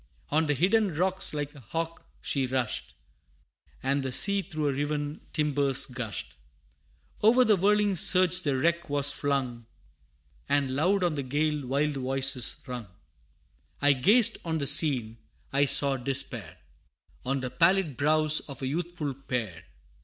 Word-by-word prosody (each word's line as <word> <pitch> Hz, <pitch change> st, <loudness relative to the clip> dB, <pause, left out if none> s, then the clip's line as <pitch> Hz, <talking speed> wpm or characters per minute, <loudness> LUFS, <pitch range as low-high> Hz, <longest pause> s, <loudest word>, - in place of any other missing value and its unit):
On 155 Hz, +2 st, +2 dB
the 145 Hz, -, +1 dB
hidden 195 Hz, -, +2 dB
rocks 185 Hz, +3 st, 0 dB
like 145 Hz, -1 st, -4 dB
a 145 Hz, -, -13 dB
hawk 165 Hz, +7 st, -5 dB, 0.2 s
she 135 Hz, -2 st, 0 dB
rushed, 125 Hz, -3 st, -2 dB, 0.9 s
And 135 Hz, +1 st, 0 dB
the 135 Hz, -1 st, -4 dB
sea 200 Hz, +9 st, +1 dB
through 160 Hz, -5 st, -6 dB
her 145 Hz, -2 st, +1 dB
riven 145 Hz, +1 st, -3 dB
timbers 145 Hz, -3 st, +1 dB
gushed: 120 Hz, -4 st, -6 dB, 0.9 s
O'er 245 Hz, +4 st, +5 dB
the 215 Hz, -2 st, +4 dB
whirling 205 Hz, +1 st, +2 dB
surge 180 Hz, +1 st, +4 dB
the 140 Hz, -6 st, -1 dB
wreck 170 Hz, +3 st, 0 dB
was 145 Hz, 0 st, +2 dB
flung, 130 Hz, -5 st, -2 dB, 0.8 s
And 140 Hz, -2 st, +1 dB
loud 180 Hz, +8 st, +1 dB
on 175 Hz, -3 st, +1 dB
the 145 Hz, -, -3 dB
gale 145 Hz, +1 st, -1 dB
wild 145 Hz, +2 st, 0 dB
voices 130 Hz, -1 st, 0 dB
rung. 125 Hz, -5 st, -7 dB, 0.9 s
I 145 Hz, 0 st, +4 dB
gazed 215 Hz, -, +4 dB
on 160 Hz, -1 st, -2 dB
the 145 Hz, -, -2 dB
scene 135 Hz, -7 st, +2 dB, 0.3 s
I 140 Hz, +1 st, +3 dB
saw 140 Hz, 0 st, +3 dB
despair 125 Hz, -, -2 dB, 0.7 s
On 135 Hz, +1 st, -2 dB
the 125 Hz, -1 st, -4 dB
pallid 170 Hz, -3 st, +2 dB
brows 155 Hz, +3 st, +2 dB
of 140 Hz, -1 st, -9 dB
a -, -, -1 dB
youthful 165 Hz, -1 st, -3 dB
pair. 120 Hz, -10 st, -5 dB
145 Hz, 145 wpm, -27 LUFS, 130-165 Hz, 0.9 s, O'er